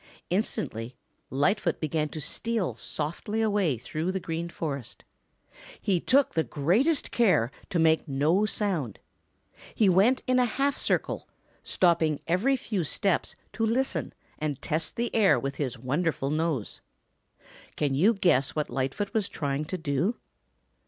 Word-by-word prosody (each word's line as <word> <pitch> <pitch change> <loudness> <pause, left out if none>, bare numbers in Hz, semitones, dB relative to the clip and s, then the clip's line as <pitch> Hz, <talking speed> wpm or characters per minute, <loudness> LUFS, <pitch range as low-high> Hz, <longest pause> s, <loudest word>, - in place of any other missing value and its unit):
Instantly 130 - -2 0.3
Lightfoot 170 +6 +1
began 155 -1 -1
to 155 - -6
steal 220 +6 -1
softly 170 +8 -4
away 205 - +2
through 155 +9 -3
the 190 - -2
Green 170 0 -4
Forest. 140 -7 -5 0.8
He 190 -3 +1
took 275 +9 +3
the 160 - +2
greatest 220 - +1
care 180 - +3 0.2
to 180 - -1
make 160 -1 +3
no 155 +9 +2
sound. 175 - -2 0.8
He 210 -4 +4
went 205 +8 +4
in 255 -1 +3
a 250 - +4
half 275 +3 0
circle, - - -1 0.3
stopping 165 -4 +2
every 200 +11 +2
few 210 -7 -2
steps 185 +5 0 0.2
to 225 - -2
listen 245 +4 0 0.3
and 150 -3 -2
test 160 0 -2
the 235 +1 -2
air 210 -4 +4
with 135 0 -4
his 135 -3 -2
wonderful 140 +3 -1
nose. 155 -7 -2 0.9
Can 145 -3 0
you 195 +12 +4
guess 170 -9 +2
what 150 -1 -2
Lightfoot 135 +10 -2
was 215 -4 0
trying 145 0 -2
to 185 - -4
do? 160 - 0
170 Hz, 140 wpm, -27 LUFS, 145-210 Hz, 0.9 s, He